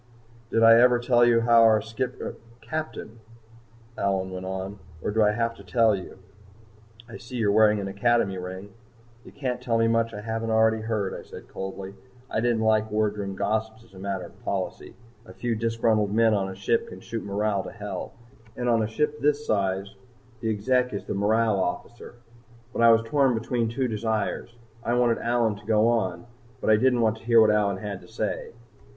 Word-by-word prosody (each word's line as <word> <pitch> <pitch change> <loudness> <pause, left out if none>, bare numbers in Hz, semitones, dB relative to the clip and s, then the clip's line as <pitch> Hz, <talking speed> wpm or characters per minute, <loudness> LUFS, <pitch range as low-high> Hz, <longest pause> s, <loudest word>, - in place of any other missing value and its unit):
"Did 115 - +2
I 115 0 +8
ever 125 0 +5
tell 120 0 +3
you 120 -1 +5
about 115 0 +5
our 110 -1 +6
skip 115 +4 -4 0.4
captain?" 115 -3 -6 0.8
Allyn 95 -2 -1
went 95 0 -6
on. 95 +2 -5 0.2
"Or 80 - -3
do 110 +1 +1
I 105 - +5
have 115 +2 0
to 100 - -13
tell 110 +3 +3
you? 95 - -9 0.9
I 115 - -9
see 120 +2 -10
you're 110 -4 +1
wearing 105 0 +4
an 100 - -4
Academy 100 -1 +1
ring." 95 +2 -8 0.5
"You - - -13
can't 125 -3 -4
tell 120 -2 0
me 115 0 +3
much 115 0 +1
I 105 - -7
haven't 115 +1 -3
already 110 0 +3
heard," 110 -3 -2
I - - -6
said - - -12
coldly. 95 0 -6 0.4
I - - 0
don't 120 -1 +1
like 110 0 +2
wardroom 105 -2 -1
gossips 110 +3 -2
as 115 - -22
a 95 - -12
matter 95 -1 -3
of - - -16
policy. - - -4 0.3
A - - -11
few 120 -2 -2
disgruntled 110 -2 +1
men 115 -1 +4
on 100 -2 0
a 95 - -7
ship 100 +4 0
can 90 - -10
shoot 115 +3 -6
morale 100 0 -1
to - - -8
hell, - - -6 0.4
and 125 - -2
on 115 -2 +3
a 110 - 0
ship 150 +6 -1
this 150 0 +1
size 100 -2 -1 0.5
the 115 - -2
Exec 125 +4 +1
is 100 - -5
the - - -3
morale 105 +1 +2
officer. 105 +7 -4 0.6
But - - -2
I 115 - +7
was 115 0 +5
torn 135 +1 +2
between 115 0 -1
two 125 +3 -1
desires. 110 +1 -2 0.3
I 120 - 0
wanted 120 -1 +2
Allyn 115 -3 0
to 105 - -16
go 110 0 +3
on, 110 -4 -1 0.3
but - - +1
I - - +7
didn't 125 +2 +2
want 110 -1 +2
to - - -17
hear 115 0 +5
what 110 -1 +6
Allyn 100 -2 +1
had 100 -1 -6
to - - -15
say. 465 - -4
110 Hz, 200 wpm, -25 LUFS, 100-115 Hz, 0.9 s, I